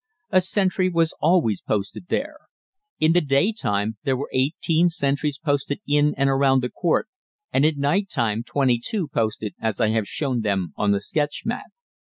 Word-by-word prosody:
A 185 - +5
sentry 185 0 +1
was 165 -2 +1
always 155 - +2
posted 105 - -3
there. 305 +7 -2 0.6
In 155 +1 +4
the 175 - +4
day 140 +7 +2
time 105 - -1
there 135 -1 +1
were 140 - -5
eighteen 160 +5 +2
sentries 140 -3 -1
posted 145 -1 -1
in 145 +1 +2
and 140 0 +2
around 135 -1 +3
the 125 - -2
court, 170 -3 0 0.5
and 145 - +4
at 155 -2 -1
night 185 +8 +1
time 115 -4 0
twenty 125 -1 +1
two 185 - -2
posted 110 -3 -2
as 110 -3 -1
I 110 -3 +3
have 110 -2 0
shown 130 -6 -1
them 95 -5 -1
on 105 - 0
the 100 -1 +2
sketch 145 +6 -2
map. - - -3
140 Hz, 180 wpm, -23 LUFS, 115-165 Hz, 0.6 s, A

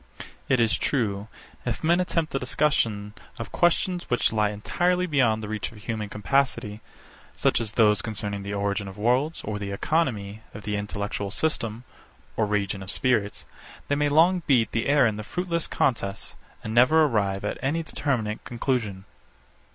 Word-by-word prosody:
It 130 - +4
is 115 +1 +3
true, 105 -6 -1 0.4
if 120 +3 -3
men 170 +3 +4
attempt 165 -3 -1
the 135 - +1
discussion 115 -7 0 0.2
of 115 - -6
questions 175 +1 +1
which 125 -2 +2
lie 105 -1 +2
entirely 180 - 0
beyond 125 -9 +2
the - - -4
reach 110 0 -3
of 115 - -14
human 105 0 -4
capacity, 110 -2 0 0.5
such - - +2
as 110 -2 -4
those 105 -3 +4
concerning 105 -2 -4
the 100 +1 -5
origin 100 0 -1
of 95 +1 -9
worlds, 125 +9 +1
or 105 0 -3
the 100 -1 -4
economy 110 -4 -1
of 105 - -8
the 105 0 -2
intellectual 100 0 -3
system 115 -2 -1 0.5
or 110 - +1
region 100 -2 -1
of 95 - -6
spirits, 105 -3 0 0.4
they 145 - +3
may 145 0 +2
long 170 +5 +4
beat 125 -5 +3
the 115 - -1
air 140 -2 +5
in 110 -2 +1
their 105 - -5
fruitless 170 - -2
contests, 100 -7 -1 0.3
and 110 - -4
never 130 +7 +6
arrive 100 -6 0
at - - -3
any 160 +5 0
determinate 120 -9 -2
conclusion. 115 -6 -2
110 Hz, 165 wpm, -26 LUFS, 105-140 Hz, 0.5 s, never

